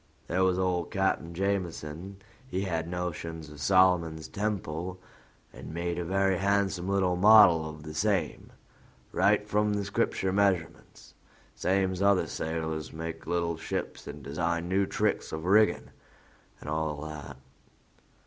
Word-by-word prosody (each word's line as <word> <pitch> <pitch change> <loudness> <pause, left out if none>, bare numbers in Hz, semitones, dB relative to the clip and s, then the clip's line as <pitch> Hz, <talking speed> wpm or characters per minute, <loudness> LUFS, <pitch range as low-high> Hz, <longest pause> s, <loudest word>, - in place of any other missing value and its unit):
There 90 +2 +1
was 95 -1 +2
old 90 -2 0
Cap'n 95 -3 -1
Jameson: 90 -2 -3 0.3
he 95 -7 -2
had 85 -4 -2
notions 85 -3 -5
of 75 -2 -11
Solomon's 90 -3 +3
Temple, 95 -4 -3 0.5
and - - -9
made 85 0 -2
a - - -1
very 95 +1 +1
handsome 100 -2 +1
little 95 -2 +2
model 90 -5 +7
of 75 -1 -10
the 75 +1 -8
same, 95 -1 -1 0.6
right - - +2
from 105 0 +1
the 100 -1 -1
Scripture 95 -2 0
measurements, 95 -5 -1 0.4
same's 95 0 0
other 100 -1 +4
sailors 80 -1 -4
make 80 0 -6
little 85 -1 -1
ships - - -5
and 75 - -8
design 85 +4 -2
new 95 +2 +1
tricks - - -1
of 80 +1 -5
rigging 105 +3 +3 0.7
and - - -11
all 80 -1 -2
that. 75 -3 -8
90 Hz, 135 wpm, -29 LUFS, 80-95 Hz, 0.7 s, model